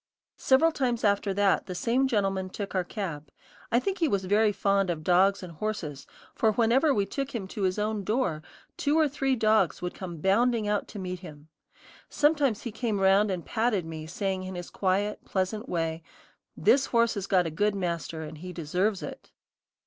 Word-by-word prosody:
Several 275 +5 +4
times 245 -6 -1
after 200 -1 +2
that, 200 0 +2
the 180 - -5
same 245 +7 +1
gentleman 195 -5 0
took 200 +1 -6
our 185 -2 +1
cab. 165 -7 -5 0.4
I 235 - +4
think 385 +8 -2
he 330 - +3
was 195 -7 0
very 210 +3 +3
fond 195 -1 +1
of 160 -3 -2
dogs 185 +3 +3
and 180 - -7
horses, 155 -7 -4 0.3
for 220 -1 +2
whenever 245 +7 +3
we 205 -6 +1
took 275 +6 -4
him 200 -5 -3
to 205 - -6
his 185 0 +1
own 210 0 -1
door, 210 -8 0 0.4
two 290 +2 +1
or 315 -1 +4
three 270 -1 0
dogs 215 -5 +2
would 180 0 -4
come 175 -3 -7
bounding 220 +6 +2
out 210 0 0
to - - -10
meet 180 -2 -4
him. 155 -4 -12 0.6
Sometimes 290 -7 +2
he 235 - -4
came 215 -2 -2
round 195 +2 +4
and 180 -3 -3
patted 220 -6 0
me 160 -1 -7
saying 190 +2 -2
in 185 0 -6
his 175 -1 -7
quiet, 200 +2 0
pleasant 200 +4 -2
way: 165 -1 -2 0.6
"This 275 0 +4
horse 235 -1 +2
has 200 -2 -4
got 185 -2 +3
a 165 - -3
good 205 +6 +1
master, 170 -3 -3
and 155 0 -9
he 180 +2 -7
deserves 180 +5 -1
it." - - -8
200 Hz, 195 wpm, -28 LUFS, 180-225 Hz, 0.6 s, Several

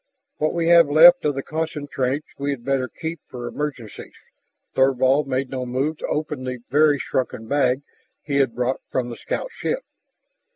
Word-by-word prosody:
"What 155 +2 0
we 165 -1 0
have 170 -3 +7
left 260 - +7
of 145 -2 +1
the 135 - -3
concentrates 145 -3 -2
we 140 +1 -2
had 130 -4 -4
better 135 -2 0
keep 160 +7 -6
for 125 -1 -7
emergencies." 130 -4 -6 0.6
Thorvald 135 +2 +3
made 130 0 -2
no 130 -1 -3
move 135 +5 -2
to - - -4
open 150 -3 -3
the 130 0 -4
very 150 0 +4
shrunken 125 -4 -3
bag 135 0 +1 0.4
he 140 -1 -1
had 135 -4 +2
brought 125 +2 -1
from 125 -2 -2
the - - -6
scoutship. - - -3
140 Hz, 165 wpm, -22 LUFS, 130-150 Hz, 0.6 s, have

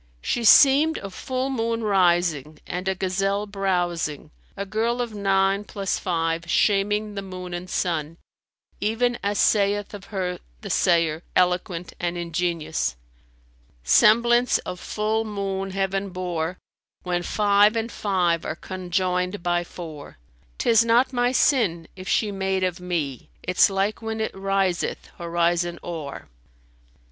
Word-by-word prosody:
"[FN#287] - - -34
She 240 - 0
seemed 285 +7 +7
a 195 - -7
full 260 +6 -3
moon 230 -2 -1
rising 175 -7 +2
and 180 +1 -4
a 190 - +1
gazelle 195 +2 -1
browsing, 175 -6 -2 0.3
a 200 - -3
girl 225 +4 -1
of 240 -3 -2
nine 195 0 +1
plus 200 -2 -3
five[FN#288] 165 -1 -1
shaming 210 +2 +2
the 200 - -4
moon 185 -2 -7
and 175 +1 -6
sun, 165 -3 -2 0.6
even 235 +3 0
as 200 0 -1
saith 205 0 +2
of 200 -1 -8
her 185 -3 -3 0.2
the - - -6
sayer 165 -2 +2
eloquent 180 -1 0
and 175 0 -2
ingenious, 170 - -2 0.9
"Semblance 235 - +5
of 180 - -5
full 215 +3 -1
moon 195 -2 -3
Heaven 195 +1 -1
bore, 180 -1 -3 0.2
* - - -47
When 175 -1 -1
five 205 +3 +3
and 230 +1 -2
five 180 -5 0
are 155 - -3
conjoined 180 +1 -2
by 175 0 +1
four; 160 - -10 0.4
'Tis 230 -1 +4
not 235 +3 +3
my 245 0 +2
sin 205 - +2
if 185 0 -9
she 210 -2 +1
made 190 -1 -1
of 180 -1 -1
me 165 -8 -3
* - - -35
Its 180 +2 +4
like 195 +3 -1
when 225 0 -4
it 220 - -2
riseth 195 -2 -1
horizon 170 0 0
o'er." 160 -5 -6
190 Hz, 140 wpm, -24 LUFS, 175-210 Hz, 0.9 s, seemed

